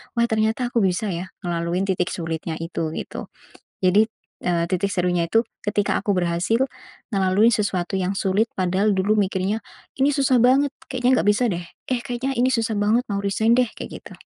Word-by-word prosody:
Wah, 235 Hz, -, +3 dB
ternyata 220 Hz, +2 st, +1 dB
aku 235 Hz, -, +2 dB
bisa, 190 Hz, +2 st, 0 dB
ya, 175 Hz, +1 st, -4 dB, 0.2 s
ngelaluin 170 Hz, +1 st, -1 dB
titik 180 Hz, -2 st, 0 dB
sulitnya 165 Hz, -1 st, -4 dB
itu," 165 Hz, -1 st, -3 dB
gitu. -, -, -6 dB, 0.6 s
Jadi, 195 Hz, +4 st, +5 dB, 0.4 s
eee, 170 Hz, -1 st, +2 dB
titik 195 Hz, +2 st, 0 dB
serunya 180 Hz, -2 st, +1 dB
itu 225 Hz, +7 st, +3 dB, 0.2 s
ketika 205 Hz, -1 st, +1 dB
aku 205 Hz, -, 0 dB
berhasil 180 Hz, +6 st, +1 dB, 0.5 s
ngelalui 195 Hz, +3 st, +4 dB
sesuatu 195 Hz, -4 st, -1 dB
yang 190 Hz, +1 st, -1 dB
sulit, 200 Hz, +4 st, +1 dB
padahal 190 Hz, +3 st, +1 dB
dulu 200 Hz, +3 st, +2 dB
mikirnya, 195 Hz, +1 st, 0 dB, 0.4 s
"Ini 270 Hz, +2 st, +4 dB
susah 270 Hz, -3 st, +3 dB
banget 270 Hz, +3 st, +4 dB, 0.2 s
kayaknya 255 Hz, -1 st, +2 dB
nggak -, -, -2 dB
bisa, 230 Hz, +3 st, +2 dB
deh. 175 Hz, -1 st, -3 dB, 0.3 s
Eh, 250 Hz, -2 st, +1 dB
kayaknya 260 Hz, +2 st, -2 dB
ini 255 Hz, +2 st, +3 dB
susah 225 Hz, -1 st, 0 dB
banget 215 Hz, +4 st, +3 dB
mau 200 Hz, -, 0 dB
resign 220 Hz, +3 st, +2 dB
deh," 250 Hz, -, +4 dB
kayak -, -, -7 dB
gitu. -, -, -11 dB
200 Hz, 175 wpm, -23 LUFS, 180-230 Hz, 0.6 s, Jadi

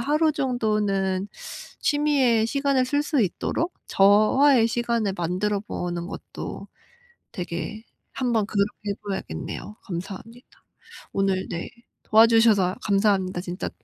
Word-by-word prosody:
하루 305 Hz, +5 st, +2 dB
정도는 210 Hz, -7 st, 0 dB, 0.5 s
취미에 275 Hz, -7 st, +2 dB
시간을 275 Hz, 0 st, +1 dB
쓸 285 Hz, +2 st, +1 dB
수 295 Hz, -4 st, 0 dB
있도록 300 Hz, -, -2 dB
저와의 225 Hz, +6 st, +5 dB
시간을 230 Hz, -3 st, 0 dB
만들어 185 Hz, +4 st, -1 dB
보는 175 Hz, -5 st, -4 dB
것도 -, -, -8 dB, 0.7 s
되게 180 Hz, +5 st, -5 dB, 0.3 s
한번 235 Hz, -5 st, 0 dB
그렇게 205 Hz, 0 st, -2 dB
해 -, -, +1 dB
봐야겠네요. 195 Hz, -, -5 dB
감사합니다. 200 Hz, +7 st, -7 dB, 0.7 s
오늘 195 Hz, -1 st, +1 dB
네 170 Hz, -1 st, -4 dB, 0.3 s
도와주셔서 220 Hz, -4 st, +5 dB
감사합니다. 195 Hz, -3 st, +1 dB
진짜 180 Hz, +2 st, -4 dB
210 Hz, 270 characters per minute, -24 LUFS, 190-245 Hz, 0.7 s, 저와의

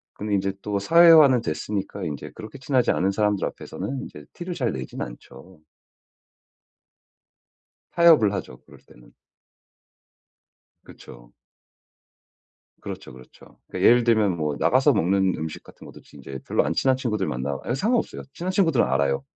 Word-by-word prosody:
근데 105 Hz, 0 st, -4 dB
이제 95 Hz, 0 st, -1 dB
또 105 Hz, -1 st, -2 dB
사회화는 155 Hz, -, +6 dB
됐으니까 100 Hz, +4 st, -4 dB
인제 75 Hz, -5 st, -6 dB
그렇게 110 Hz, +6 st, -10 dB
친하지 130 Hz, -1 st, +1 dB
않은 95 Hz, +2 st, 0 dB
사람들 105 Hz, -1 st, 0 dB
앞에서는 135 Hz, -1 st, -6 dB
인제 75 Hz, -1 st, -11 dB
티를 175 Hz, +1 st, -6 dB
잘 125 Hz, -, -1 dB
내진 65 Hz, -5 st, -7 dB
않죠. 80 Hz, +8 st, -10 dB, 2.3 s
타협을 160 Hz, -, +5 dB
하죠 85 Hz, -10 st, -6 dB
그럴 -, -, -17 dB
때는. -, -, -20 dB, 1.7 s
그쵸. -, -, -15 dB, 1.5 s
그렇죠, -, -, -8 dB
그렇죠. 65 Hz, 0 st, -17 dB
그 -, -, -5 dB
예를 120 Hz, +1 st, +5 dB
들면 110 Hz, -5 st, +2 dB
뭐 75 Hz, -2 st, -2 dB
나가서 -, -, +3 dB
먹는 95 Hz, +1 st, +1 dB
음식 80 Hz, 0 st, -6 dB
같은 -, -, -16 dB
것도 -, -, -13 dB
인제 70 Hz, -1 st, -9 dB
별로 -, -, +1 dB
안 -, -, -1 dB
친한 130 Hz, -1 st, +2 dB
친구들 110 Hz, -7 st, -2 dB
만나 65 Hz, +2 st, -3 dB
예 120 Hz, -, 0 dB
상관없어요. 225 Hz, -, -1 dB
친한 180 Hz, +2 st, -4 dB
친구들은 165 Hz, -9 st, +2 dB
알아요. 70 Hz, 0 st, 0 dB
100 Hz, 310 characters per minute, -23 LUFS, -, 2.3 s, 사회화는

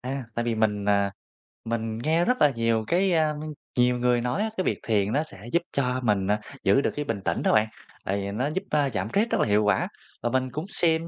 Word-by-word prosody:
A, 130 Hz, +1 st, -4 dB
tại 120 Hz, -, -1 dB
vì 120 Hz, -, 0 dB
mình, 105 Hz, -2 st, +1 dB
à, 100 Hz, -1 st, +2 dB, 0.5 s
mình 115 Hz, -1 st, -2 dB
nghe 160 Hz, +8 st, +1 dB
rất 250 Hz, +1 st, +2 dB
là 150 Hz, -, +7 dB
nhiều 115 Hz, -1 st, +1 dB
cái, 185 Hz, +1 st, +2 dB
a, 155 Hz, -2 st, +2 dB, 0.4 s
nhiều 125 Hz, 0 st, +3 dB
người 120 Hz, -1 st, +2 dB
nói 125 Hz, -, -1 dB
á, 220 Hz, -, 0 dB
cái 185 Hz, -, +1 dB
việc -, -, -1 dB
thiền 105 Hz, -2 st, +2 dB
nó 150 Hz, +3 st, +2 dB
sẽ 105 Hz, -6 st, -12 dB
giúp 170 Hz, -, +3 dB
cho 130 Hz, -2 st, 0 dB
mình, 100 Hz, -4 st, +1 dB
à, 105 Hz, +1 st, +2 dB, 0.2 s
giữ 135 Hz, -, +4 dB
được -, -, 0 dB
cái 145 Hz, 0 st, -2 dB
bình 110 Hz, -5 st, -2 dB
tĩnh -, -, 0 dB
đó -, -, +3 dB
bạn, 110 Hz, 0 st, +4 dB, 0.4 s
tại 100 Hz, +1 st, 0 dB
vì 100 Hz, 0 st, -3 dB
nó 125 Hz, +7 st, -1 dB
giúp, 190 Hz, -, -2 dB
a, 145 Hz, -2 st, +2 dB
giảm 105 Hz, -3 st, -3 dB
stress 215 Hz, -, +1 dB
rất -, -, +2 dB
là -, -, +2 dB
hiệu 105 Hz, +1 st, +3 dB
quả. 105 Hz, -, +2 dB, 0.4 s
Và 120 Hz, -, +1 dB
mình 130 Hz, +1 st, 0 dB
cũng 155 Hz, +6 st, -4 dB
xem 165 Hz, -5 st, +1 dB
125 Hz, 255 wpm, -26 LUFS, 110-150 Hz, 0.5 s, là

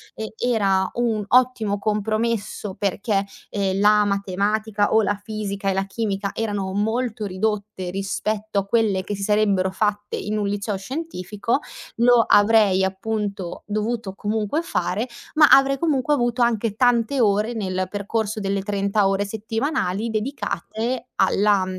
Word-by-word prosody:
e 220 Hz, 0 st, -6 dB
era 195 Hz, -6 st, +2 dB
un 230 Hz, -3 st, 0 dB
ottimo 245 Hz, -5 st, +3 dB
compromesso 215 Hz, 0 st, -1 dB
perché, 200 Hz, 0 st, -1 dB, 0.3 s
ehm, 195 Hz, -1 st, 0 dB
la 210 Hz, 0 st, +5 dB
matematica 205 Hz, +2 st, 0 dB
o 220 Hz, -1 st, +4 dB
la 205 Hz, +1 st, +1 dB
fisica 205 Hz, -2 st, -3 dB
e -, -, +1 dB
la 195 Hz, +1 st, 0 dB
chimica 200 Hz, -1 st, -2 dB
erano 205 Hz, -4 st, -2 dB
molto 220 Hz, +2 st, -1 dB
ridotte 200 Hz, -1 st, -2 dB
rispetto 205 Hz, +2 st, -3 dB
a 195 Hz, -, +2 dB
quelle 200 Hz, -3 st, +1 dB
che 205 Hz, -, -4 dB
si 200 Hz, -, -5 dB
sarebbero 200 Hz, -2 st, +2 dB
fatte 205 Hz, +1 st, -1 dB
in 210 Hz, +1 st, -2 dB
un 205 Hz, -, 0 dB
liceo 200 Hz, 0 st, -2 dB
scientifico, 225 Hz, -, -3 dB, 0.4 s
lo 235 Hz, 0 st, +5 dB
avrei 205 Hz, -2 st, +5 dB
appunto 195 Hz, -1 st, -3 dB
dovuto 215 Hz, -1 st, -2 dB
comunque 215 Hz, +10 st, -1 dB
fare 210 Hz, -, -1 dB, 0.3 s
ma 305 Hz, 0 st, +8 dB
avrei 275 Hz, 0 st, +6 dB
comunque 295 Hz, -2 st, +1 dB
avuto 240 Hz, -1 st, 0 dB
anche 230 Hz, -3 st, +1 dB
tante 245 Hz, +2 st, +2 dB
ore, 210 Hz, +2 st, +2 dB
nel 185 Hz, -4 st, -2 dB
percorso 210 Hz, +2 st, -2 dB
delle 195 Hz, -1 st, -1 dB
30 200 Hz, 0 st, +1 dB
ore 195 Hz, +1 st, 0 dB
settimanali, 225 Hz, +7 st, -3 dB, 0.4 s
dedicate 225 Hz, +1 st, -3 dB
alla, 195 Hz, 0 st, +3 dB
210 Hz, 140 wpm, -22 LUFS, 200-225 Hz, 0.4 s, ma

